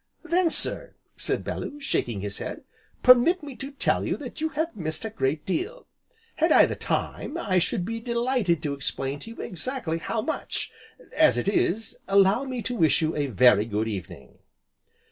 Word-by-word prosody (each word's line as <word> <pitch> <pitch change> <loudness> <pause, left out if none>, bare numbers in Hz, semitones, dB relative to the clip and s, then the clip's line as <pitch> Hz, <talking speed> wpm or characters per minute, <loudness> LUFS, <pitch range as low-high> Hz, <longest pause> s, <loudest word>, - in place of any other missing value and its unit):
"Then 340 +1 +2
sir," - - +1 0.2
said - - -1
Bellew, 290 - -5
shaking 120 - -1
his 100 0 -5
head, - - -6 0.4
"permit 255 +8 +6
me 285 -3 -8
to 270 - -6
tell 280 - 0
you - - -1
that - - -8
you 315 - +1
have 320 -3 -1
missed 160 +1 -4
a 220 - -4
great 150 -7 -1
deal. 395 - -3 0.5
Had - - +2
I - - +8
the - - -3
time, - - -3
I 185 -2 +1
should 175 +1 -1
be 230 +3 -3
delighted 235 - 0
to 145 -2 -1
explain 135 0 -3
to 185 - -8
you 230 - -11
exactly 180 - -3
how 215 +6 -2
much, 315 - -3 0.4
as 310 -1 +5
it - - -1
is 205 +1 0
allow 195 +6 +4
me 255 -3 -4
to 250 - -2
wish 160 -5 +3
you 160 +1 0
a 145 -1 0
very 120 -3 +5
good 110 0 -1
evening." 90 -8 -7
200 Hz, 185 wpm, -26 LUFS, -, 0.5 s, I